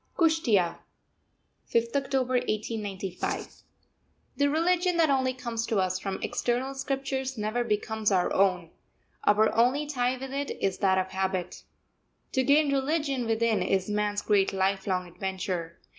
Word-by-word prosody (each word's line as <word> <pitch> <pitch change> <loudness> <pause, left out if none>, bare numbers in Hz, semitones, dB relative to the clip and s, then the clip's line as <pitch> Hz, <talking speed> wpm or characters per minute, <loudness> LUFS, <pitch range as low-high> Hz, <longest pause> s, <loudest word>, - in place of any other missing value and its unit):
KUSHTEA, 245 - +2 0.9
5th 235 +1 +1
October 265 -2 0
1895. 210 -5 -3 0.7
The 285 0 +2
religion 350 +3 +2
that 320 -3 +4
only 260 -1 +2
comes 235 -3 -4
to 225 - 0
us 185 -1 +1
from 195 -1 -3
external 250 +3 -1
scriptures 270 -1 -3
never 215 +3 -1
becomes 215 -1 -1
our 185 -2 +2
own; 180 -4 +2 0.5
our 215 +1 +4
only 255 +6 +3
tie 255 -3 0
with 270 +1 -7
it 280 0 -2
is 195 -1 -1
that 190 -2 +3
of 185 0 0
habit. 190 -1 -3 0.7
To 260 - +2
gain 285 +2 +4
religion 275 -3 0
within 225 -1 +1
is 190 +1 0
man's 210 0 0
great 200 -2 +3
lifelong 190 -1 0
adventure. 180 -2 -4
230 Hz, 135 wpm, -28 LUFS, 195-270 Hz, 0.9 s, that